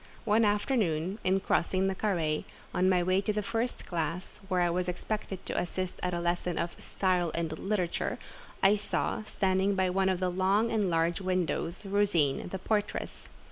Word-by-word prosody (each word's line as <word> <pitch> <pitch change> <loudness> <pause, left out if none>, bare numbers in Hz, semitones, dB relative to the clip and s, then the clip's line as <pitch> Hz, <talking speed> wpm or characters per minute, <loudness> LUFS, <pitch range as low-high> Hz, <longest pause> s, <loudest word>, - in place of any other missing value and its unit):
One 220 +1 +4
afternoon, 205 - +1
in 190 +1 +2
crossing 185 +1 +1
the 195 - +1
carré, 170 -7 0 0.3
on 185 +1 +3
my 180 -2 +3
way 185 +2 +2
to 205 - 0
the 210 0 -1
first 230 +3 -2
classe, 170 +2 -3
where 185 -2 +1
I 175 - +3
was 180 +1 0
expected 190 +1 -4
to - - -4
assist 180 +1 -3
at 180 - 0
a 175 - -1
lesson 175 0 -1
of 170 - -1
"style 180 -3 +1
and 165 -2 -2
literature," 190 -4 -1 0.5
I 200 +2 +6
saw, 210 - -1
standing 190 -1 +1
by 185 -1 +2
one 190 +1 +2
of 185 -2 0
the 185 -1 0
long 195 +5 +2
and 210 -4 +1
large 165 +2 +1
windows, 185 0 -1
Rosine, 195 -8 +2
the 190 - -3
portress. 210 +2 -2
185 Hz, 180 wpm, -30 LUFS, 175-200 Hz, 0.5 s, I